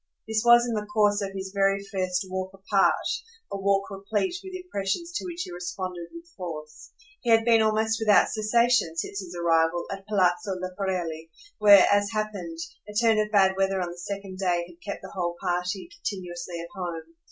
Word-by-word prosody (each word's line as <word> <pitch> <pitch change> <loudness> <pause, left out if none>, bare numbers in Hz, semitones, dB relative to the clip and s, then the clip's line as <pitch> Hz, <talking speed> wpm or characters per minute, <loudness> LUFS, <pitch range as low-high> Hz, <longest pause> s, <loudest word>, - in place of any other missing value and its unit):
This 220 0 +1
was 240 0 +7
in 240 - -2
the 210 -1 -2
course 210 -1 +2
of 200 - -2
his 190 0 -5
very 195 0 +2
first 185 -2 -1
walk 185 0 -3
apart, 195 0 +2 0.5
a 200 - -2
walk 200 +1 +1
replete 205 - -1
with 380 -1 -8
impressions 340 - -3
to 345 - -3
which 345 -1 -4
he - - -8
responded 180 0 -5
with 335 0 -11
force. 155 -4 -8 0.3
He 240 - -3
had 225 0 +5
been 230 -2 +5
almost 220 +1 +2
without 210 -2 +5
cessation, 220 -5 +2
since 195 - -3
his 180 -2 -7
arrival, 165 0 +2
at 195 0 -7
Palazzo 195 -1 +1
Leporelli, 180 -4 -3 0.3
where, 205 -2 +8
as 205 0 +3
happened, 215 - -4 0.3
a 210 - -9
turn 225 0 +4
of 210 0 +1
bad 190 -2 +4
weather 195 0 +1
on 175 -1 -2
the 175 - -10
second 195 0 -6
day 175 -3 +1
had 175 0 -17
kept 200 - -6
the 190 - -9
whole 175 -2 -2
party 180 - -2
continuously 180 - -5
at 170 0 -7
home. 175 - -6
195 Hz, 185 wpm, -26 LUFS, 180-215 Hz, 0.5 s, where